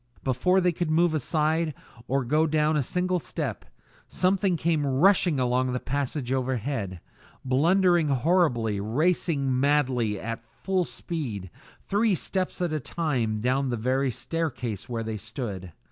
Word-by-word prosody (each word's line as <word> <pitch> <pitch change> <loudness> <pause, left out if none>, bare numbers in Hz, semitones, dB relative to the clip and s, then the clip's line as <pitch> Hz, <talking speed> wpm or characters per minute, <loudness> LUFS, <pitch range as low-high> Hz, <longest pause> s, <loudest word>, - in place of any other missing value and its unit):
Before 160 +9 +2
they 180 0 +3
could 170 -1 -2
move 165 +1 +3
aside, 155 +1 0 0.3
or 135 -1 0
go 155 +6 +2
down 155 0 +2
a 150 - +2
single 180 +6 0
step, - - -4 0.4
someone 185 -1 +1
came 160 -2 +1
rushing 155 +3 +3
along 125 0 +1
the 125 - -1
passage 135 -1 -2
overhead, 125 -7 -2 0.5
blundering 170 +5 +3
horribly, 130 - +2
racing 140 - +1
madly, 130 -7 +1
at 115 +1 -5 0.2
full 190 -2 +1
speed, 115 - -5 0.3
three 205 0 +2
steps 185 +1 -2
at 170 -3 -1
a 155 - 0
time, 125 -8 -1
down 130 +3 +1
the 120 - -1
very 130 +4 +1
staircase 125 - -3
where 115 -2 -2
they 110 -1 -4
stood. 105 -4 -5
140 Hz, 140 wpm, -26 LUFS, 120-170 Hz, 0.5 s, they